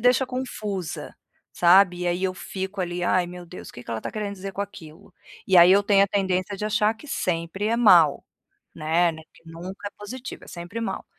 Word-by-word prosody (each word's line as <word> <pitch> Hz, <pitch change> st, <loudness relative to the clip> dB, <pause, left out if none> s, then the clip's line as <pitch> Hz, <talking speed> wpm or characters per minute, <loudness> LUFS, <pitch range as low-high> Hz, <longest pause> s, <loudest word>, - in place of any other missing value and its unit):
deixa 250 Hz, +2 st, +3 dB
confusa, 215 Hz, -8 st, -5 dB, 0.4 s
sabe, 180 Hz, 0 st, +5 dB
e 180 Hz, -, -1 dB
aí 175 Hz, +2 st, 0 dB
eu 185 Hz, -, -1 dB
fico 190 Hz, +1 st, -5 dB
ali: 175 Hz, 0 st, -2 dB
"Ai 180 Hz, -1 st, +2 dB
meu 180 Hz, 0 st, -9 dB
Deus, 180 Hz, -, -10 dB
que 120 Hz, -, -11 dB
que -, -, -9 dB
ela 115 Hz, -, -2 dB
está -, -, -5 dB
querendo 210 Hz, -2 st, -4 dB
dizer 195 Hz, 0 st, -7 dB
com 200 Hz, -, -5 dB
aquilo?" 200 Hz, -2 st, -12 dB, 0.3 s
E 190 Hz, -2 st, +4 dB
aí 175 Hz, +1 st, +9 dB
eu 200 Hz, -, +5 dB
tenho 200 Hz, -1 st, +4 dB
a -, -, -5 dB
tendência 190 Hz, 0 st, -1 dB
de 210 Hz, -, -4 dB
achar 215 Hz, 0 st, +2 dB
que 265 Hz, +7 st, -15 dB
sempre 180 Hz, -3 st, -2 dB
é 230 Hz, -, +1 dB
mau, 175 Hz, -11 st, +5 dB, 0.5 s
né, 165 Hz, +2 st, +1 dB
não 160 Hz, -, -10 dB
é 160 Hz, -, -16 dB
que -, -, -21 dB
nunca 185 Hz, +5 st, -7 dB
é -, -, -21 dB
positivo, 245 Hz, +5 st, -8 dB
é -, -, -17 dB
sempre 175 Hz, +6 st, -7 dB
mau. 230 Hz, -, -4 dB
190 Hz, 220 wpm, -24 LUFS, 175-205 Hz, 0.5 s, aí